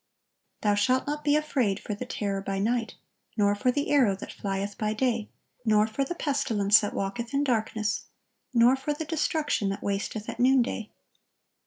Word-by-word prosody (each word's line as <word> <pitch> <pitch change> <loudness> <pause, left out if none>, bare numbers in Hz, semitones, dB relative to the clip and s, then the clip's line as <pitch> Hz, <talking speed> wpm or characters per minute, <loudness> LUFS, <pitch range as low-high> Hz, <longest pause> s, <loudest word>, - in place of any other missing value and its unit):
Thou 210 -1 +3
shalt 255 +6 +2
not 295 +1 -3
be 290 0 +3
afraid 260 -10 +1
for 210 - -5
the 205 - -6
terror 200 -2 -2
by 195 0 -3
night; 230 +3 0 0.4
nor 205 -1 +3
for 230 +5 0
the 285 +3 -1
arrow 255 -9 +4
that 195 - -9
flieth 200 0 -3
by 215 0 -1
day; 235 -2 0 0.3
nor 215 -2 +4
for 220 +5 -2
the 350 +6 -4
pestilence 220 -10 +3
that 205 - -3
walketh 230 +6 -3
in 280 - +2
darkness; 220 -4 -1 0.5
nor 240 +1 +5
for 270 +2 -3
the 315 - -4
destruction 300 -8 0
that 195 - -4
wasteth 205 +2 -3
at - - -6
noonday. 245 -3 +2
225 Hz, 175 wpm, -27 LUFS, 205-270 Hz, 0.5 s, nor